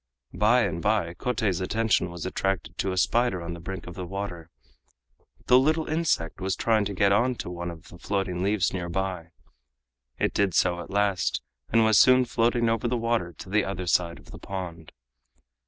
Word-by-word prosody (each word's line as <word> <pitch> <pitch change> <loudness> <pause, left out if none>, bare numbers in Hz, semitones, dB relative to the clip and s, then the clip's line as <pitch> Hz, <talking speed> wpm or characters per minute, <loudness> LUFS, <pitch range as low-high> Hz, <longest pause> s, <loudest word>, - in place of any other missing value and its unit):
By 120 +4 +4
and 85 -4 -2
by, 100 -5 +1
Kotei's 110 -4 -1
attention 105 -1 +1
was 85 -1 -7
attracted 95 -2 -2
to 95 - 0
a 95 - -4
spider 120 +1 +2
on 85 0 -5
the 85 - -8
brink 95 +1 -6
of 90 - -8
the 90 +1 -6
water. 90 -4 -6 1.0
The 125 - +6
little 155 +4 +1
insect 155 - -1
was 95 0 -1
trying 110 -3 +2
to 100 - -4
get 100 +1 +3
on 120 +5 +2
to 90 - -6
one 85 0 -5
of 85 -2 -11
the 85 - -13
floating 95 -3 -2
leaves 95 -2 +1
near 90 -2 -3
by. 90 -2 -3 0.9
It - - 0
did 100 -4 +1
so 90 -1 +2
at 85 - -8
last, 100 -2 0 0.3
and 115 -1 +4
was 110 -1 +5
soon 130 0 +6
floating 120 0 +1
over 115 +1 0
the 125 +1 0
water 115 -6 0
to 80 - -11
the 105 0 +3
other 95 -1 -4
side 85 0 +1
of - - -16
the - - -10
pond. 85 -4 -7
95 Hz, 195 wpm, -26 LUFS, 90-115 Hz, 1.0 s, The